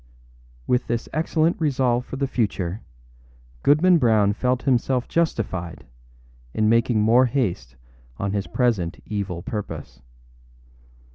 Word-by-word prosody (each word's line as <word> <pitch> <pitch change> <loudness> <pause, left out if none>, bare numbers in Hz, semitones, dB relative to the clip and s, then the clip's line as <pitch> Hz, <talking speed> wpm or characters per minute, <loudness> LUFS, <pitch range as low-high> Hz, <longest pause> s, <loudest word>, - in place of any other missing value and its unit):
â - - -29 0.6
With 125 0 0
this 120 0 -2
excellent 160 +2 0
resolve 130 -4 +1
for - - -6
the 140 +1 -1
future, 105 -6 -2 0.8
Goodman 170 - +4
Brown 110 -5 +3
felt 125 +3 -1
himself 125 -1 +1
justified 95 - -2 0.7
in 110 - +2
making 115 0 +3
more 120 +4 +5
haste 110 - -2 0.4
on 100 0 -2
his 100 -1 -2
present 110 -10 0
evil 100 -5 -4
purpose. 95 - -6
115 Hz, 120 wpm, -23 LUFS, 100-130 Hz, 0.8 s, more